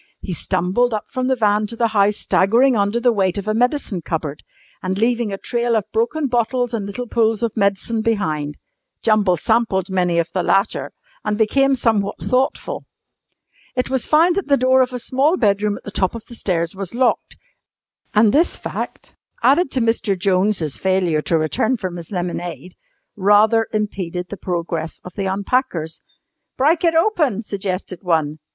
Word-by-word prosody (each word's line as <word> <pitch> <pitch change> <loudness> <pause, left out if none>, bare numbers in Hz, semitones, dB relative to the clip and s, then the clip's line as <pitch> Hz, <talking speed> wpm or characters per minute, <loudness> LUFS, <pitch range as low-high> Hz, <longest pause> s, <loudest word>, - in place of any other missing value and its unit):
He 185 - -5
stumbled 185 +8 0
up 210 - -6
from 255 -2 -1
the 260 - +2
van 210 -2 +2
to 230 - -4
the 230 0 +1
house 205 -1 +2
staggering 235 +7 +3
under 205 +2 +1
the 245 0 +3
weight 190 -4 0
of 200 +1 -4
a 215 - +1
medicine 245 - 0
cupboard, 155 -3 -4 0.4
and 185 +1 -2
leaving 235 0 +1
a 195 - -3
trail 235 +2 -1
of 215 - +1
broken 240 +7 0
bottles 245 -1 0
and 210 -3 -2
little 210 +5 -5
pools 225 -2 +1
of 230 -2 -1
medicine 200 +2 0
behind. 155 -10 -1 0.5
Jumble 205 -5 +3
sampled 195 -2 0
many 180 -2 +1
of 170 0 0
the 185 - +1
latter 195 +4 +1 0.3
and 210 - -1
became 270 +5 +3
somewhat 215 -5 0
thoughtful. 270 - -1 0.9
It 250 0 -1
was 265 -3 0
found 335 +3 +4
that 395 - -2
the 280 -1 +4
door 260 +1 +4
of 255 0 +1
a 250 - -4
small 275 +8 +1
bedroom 205 - +1
at - - -14
the 205 - -7
top 190 +1 0
of 230 - -8
the 245 - -13
stairs 170 -7 -1
was 195 +2 -5
locked, 250 0 0 0.8
and 210 0 +5
this 325 +4 +2
fact - - -6 0.3
(added 295 +4 +4
to 260 - -1
Mr. 225 -3 +1
Jones' 185 -4 +1
failure 185 -5 +1
to 165 - +1
return 160 - 0
from 185 -4 -5
his 170 +2 -9
lemonade) 175 -3 -4 0.4
rather 210 +3 +4
impeded 185 -4 -3
the - - -5
progress 170 -3 -3
of 180 - -10
the 200 - -3
unpackers. 190 - -1 0.6
"Brike 310 +6 +2
it 335 -1 +3
open," 315 - +2
suggested 190 -3 -4
one. 155 -4 0
210 Hz, 175 wpm, -20 LUFS, 185-245 Hz, 0.9 s, and